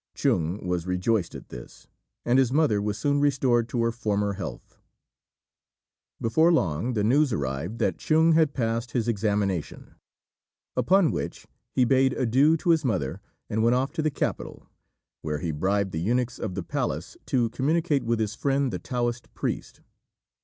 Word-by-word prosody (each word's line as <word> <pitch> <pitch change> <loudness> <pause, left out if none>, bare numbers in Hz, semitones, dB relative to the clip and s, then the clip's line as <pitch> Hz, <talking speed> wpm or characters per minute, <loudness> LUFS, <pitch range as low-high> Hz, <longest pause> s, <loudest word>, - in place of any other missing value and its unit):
Chung 85 +5 0
was 90 -1 -2
rejoiced 90 +1 0
at - - -10
this, - - -11 0.4
and 125 +2 +4
his 130 -2 +2
mother 135 -8 +2
was 105 0 -2
soon 145 +6 +1
restored 130 -5 +2
to 120 -1 0
her 115 - +1
former 105 -3 -1
health. 95 -1 -8 1.4
Before 160 +9 +3
long 100 - 0
the 105 -3 0
news 135 +6 +3
arrived 70 - -3
that - - 0
Chung 160 +1 +3
had 160 -2 +3
passed 115 -1 -2
his 120 -2 0
examination; 100 -5 -1 0.8
upon 190 -3 +3
which - - -5 0.3
he 130 - +4
bade 130 +1 +3
adieu 135 +7 +3
to 170 - +1
his 160 -2 +3
mother, 95 - -1 0.3
and 110 0 -1
went 115 +2 +4
off 135 +2 0
to 165 - -2
the 155 - +1
capital, 140 - -4 0.6
where 75 -1 -2
he 80 +2 -3
bribed 95 +5 0
the 80 - -3
eunuchs 120 +5 0
of 95 -5 -4
the 95 - -3
palace - - -3
to 120 -3 +1
communicate 150 +1 +1
with 115 0 0
his 110 -1 -1
friend 135 +2 0
the - - -3
Taoist 120 -1 -3
priest. - - -4
115 Hz, 165 wpm, -26 LUFS, 100-135 Hz, 1.4 s, and